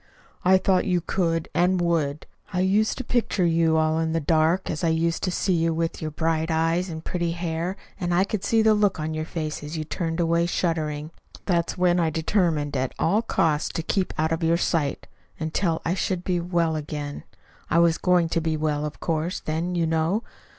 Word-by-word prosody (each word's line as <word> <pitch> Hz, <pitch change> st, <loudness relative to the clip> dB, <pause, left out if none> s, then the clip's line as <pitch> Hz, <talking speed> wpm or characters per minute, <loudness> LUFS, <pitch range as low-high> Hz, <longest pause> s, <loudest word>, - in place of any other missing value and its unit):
"I 190 Hz, +1 st, +6 dB
thought 185 Hz, -1 st, +2 dB
you 180 Hz, -2 st, +2 dB
could 165 Hz, -2 st, -1 dB
and 180 Hz, +2 st, +2 dB
would. 160 Hz, -4 st, 0 dB, 0.3 s
I 180 Hz, -2 st, 0 dB
used 205 Hz, +4 st, +2 dB
to 260 Hz, -, -3 dB
picture 230 Hz, -6 st, 0 dB
you 165 Hz, -1 st, +3 dB
all 155 Hz, 0 st, +2 dB
in 160 Hz, 0 st, 0 dB
the 165 Hz, -, +1 dB
dark, 160 Hz, +4 st, +2 dB
as 155 Hz, -, -3 dB
I -, -, +3 dB
used 165 Hz, 0 st, +1 dB
to 185 Hz, -, 0 dB
see 185 Hz, +1 st, 0 dB
you 165 Hz, -1 st, +1 dB
with 165 Hz, 0 st, -2 dB
your 155 Hz, -, -2 dB
bright 160 Hz, +1 st, -1 dB
eyes 165 Hz, +3 st, +1 dB
and 160 Hz, -1 st, -7 dB
pretty 170 Hz, -2 st, -1 dB
hair, 170 Hz, +1 st, -3 dB, 0.2 s
and 175 Hz, -2 st, -1 dB
I 175 Hz, +2 st, +4 dB
could 200 Hz, 0 st, -3 dB
see 225 Hz, 0 st, +3 dB
the 220 Hz, 0 st, +5 dB
look 205 Hz, -5 st, +2 dB
on 155 Hz, +1 st, -2 dB
your 155 Hz, 0 st, -3 dB
face 155 Hz, -2 st, -4 dB
as 150 Hz, +2 st, -5 dB
you 155 Hz, -, -2 dB
turned 165 Hz, +1 st, -3 dB
away 170 Hz, 0 st, +2 dB
shuddering. 155 Hz, -3 st, -1 dB, 0.3 s
That's 170 Hz, -3 st, 0 dB
when 180 Hz, -1 st, +3 dB
I 165 Hz, -2 st, +2 dB
determined 160 Hz, -3 st, 0 dB
at 130 Hz, -1 st, -1 dB
all 205 Hz, +7 st, +2 dB
costs 160 Hz, -9 st, +1 dB
to 165 Hz, -, -2 dB
keep 185 Hz, +2 st, 0 dB
out 160 Hz, +1 st, +1 dB
of 165 Hz, -, -1 dB
your 165 Hz, +1 st, +3 dB
sight 155 Hz, -5 st, -1 dB, 0.3 s
until 160 Hz, +1 st, -1 dB
I 165 Hz, -, +1 dB
should 180 Hz, -1 st, -1 dB
be 180 Hz, -1 st, 0 dB
well 170 Hz, -2 st, 0 dB
again. 145 Hz, -1 st, -5 dB, 0.5 s
I 160 Hz, -, +2 dB
was 170 Hz, -1 st, +4 dB
going 180 Hz, -2 st, +3 dB
to 165 Hz, -, 0 dB
be 160 Hz, -1 st, -1 dB
well, 150 Hz, -1 st, -1 dB
of 150 Hz, -, -9 dB
course, 165 Hz, +2 st, -1 dB
then, 165 Hz, +3 st, -2 dB
you 170 Hz, -1 st, +1 dB
know. 165 Hz, +7 st, 0 dB
165 Hz, 210 wpm, -25 LUFS, 160-180 Hz, 0.5 s, I